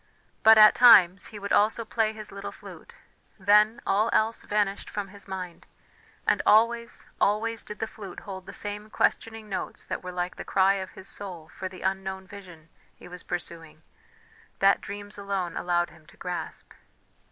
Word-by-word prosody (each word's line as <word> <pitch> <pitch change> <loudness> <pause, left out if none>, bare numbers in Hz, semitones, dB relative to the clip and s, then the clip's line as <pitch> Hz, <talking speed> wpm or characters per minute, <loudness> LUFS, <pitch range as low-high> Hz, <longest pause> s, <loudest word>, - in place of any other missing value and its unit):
But 220 0 +8
at 215 0 +9
times 200 -6 +7
he 215 - -10
would 200 0 -3
also 220 +2 +3
play 220 0 0
his 215 -1 -9
little 200 0 -7
flute; - - -13 0.4
then, 210 +3 +4
all 215 +4 +2
else 220 +1 +1
vanished 205 -1 -1
from 205 -2 -5
his 200 +1 -11
mind, 185 -3 -7 0.6
and - - +2
always, 235 +2 +2 0.2
always 225 +2 +1
did 210 - -9
the - - -2
flute 205 -4 -10
hold 190 -2 -9
the - - -7
same 210 +1 -5
questioning 225 0 -1
notes 195 - -4
that - - -5
were 180 - -6
like 180 0 -4
the - - -6
cry 195 0 +3
of 190 -1 -6
his 190 - -7
soul 175 -6 -5
for 190 - -6
the 185 -1 -11
unknown 190 0 -3
vision 180 -5 -13 0.3
he - - -14
was 180 0 -9
pursuing, 165 -3 -7 0.7
that 195 0 +4
dreams 205 +1 -8
alone 195 -3 -3
allowed 175 -1 0
him 155 -2 -20
to - - -19
grasp. 180 -1 -6
200 Hz, 175 wpm, -27 LUFS, 185-215 Hz, 0.7 s, at